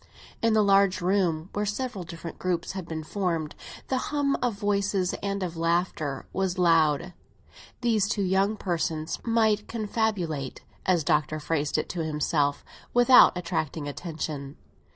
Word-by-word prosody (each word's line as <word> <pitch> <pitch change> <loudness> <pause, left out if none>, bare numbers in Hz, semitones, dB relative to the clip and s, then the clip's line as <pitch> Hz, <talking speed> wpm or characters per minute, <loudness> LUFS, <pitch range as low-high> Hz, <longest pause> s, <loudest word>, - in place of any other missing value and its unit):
In 230 -1 +3
the 215 -1 +4
large 195 -1 +4
room, 180 -3 +1
where 205 - -1
several 210 -1 -3
different 170 -1 -8
groups 175 -2 -1
had 190 -3 -6
been 160 -1 -4
formed, 165 -3 -2
and - - -13
the 260 - +1
hum 285 -2 +1
of 245 -4 0
voices 200 -2 0
and 200 -1 -2
of 175 -2 -4
laughter 165 -4 -1
was 190 -1 -1
loud, 165 -1 +3 0.7
these 220 -5 +2
two 210 -1 0
young 195 +3 +2
persons 165 -4 -2
might 220 -3 +2
confabulate, 205 - -2 0.3
as 180 -3 +3
the - - -8
Doctor 150 +1 +1
phrased 150 -1 -1
it - - -1
to 170 -2 -2
himself, 150 -2 0 0.3
without 245 -5 +7
attracting 160 -4 -3
attention. 150 -2 -5
180 Hz, 150 wpm, -27 LUFS, 160-205 Hz, 0.7 s, without